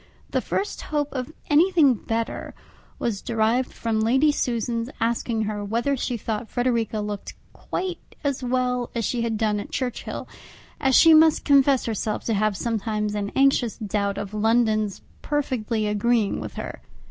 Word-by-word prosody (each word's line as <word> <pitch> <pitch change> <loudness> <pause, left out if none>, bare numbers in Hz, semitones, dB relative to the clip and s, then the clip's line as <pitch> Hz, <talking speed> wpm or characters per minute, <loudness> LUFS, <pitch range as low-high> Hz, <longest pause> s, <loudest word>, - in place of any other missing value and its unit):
The - - +1
first 405 - -2
hope 295 -1 -2
of 255 +2 -4 0.2
anything 315 -2 +5
better 230 +2 -3 0.4
was 215 -5 -2
derived 230 +3 +1
from 225 -1 -2
Lady 265 +7 +4
Susan's 235 -3 -1
asking 230 -1 0
her 210 -1 -3
whether 235 +7 0
she 250 -1 -2
thought 220 +1 -4
Frederica 235 -3 0
looked 210 -1 -5 0.2
quite 365 -2 -4 0.2
as 280 -2 -1
well 250 -1 0
as 230 -2 0
she 245 - -1
had 230 -2 -1
done 210 -1 +1
at - - -7
Churchhill, 250 -3 -4 0.5
as 265 -2 +3
she 325 -1 +8
must 315 0 +5
confess 275 -2 +4
herself 215 -1 -2
to 225 - 0
have 210 -1 +1
sometimes 215 -2 -1
an 205 -1 -2
anxious 270 -4 +3
doubt 200 -2 -1
of 200 +1 -5
London's 215 -1 +1 0.2
perfectly 245 -7 -1
agreeing 210 +1 +1
with - - -7
her. - - -6
230 Hz, 155 wpm, -24 LUFS, 215-260 Hz, 0.5 s, she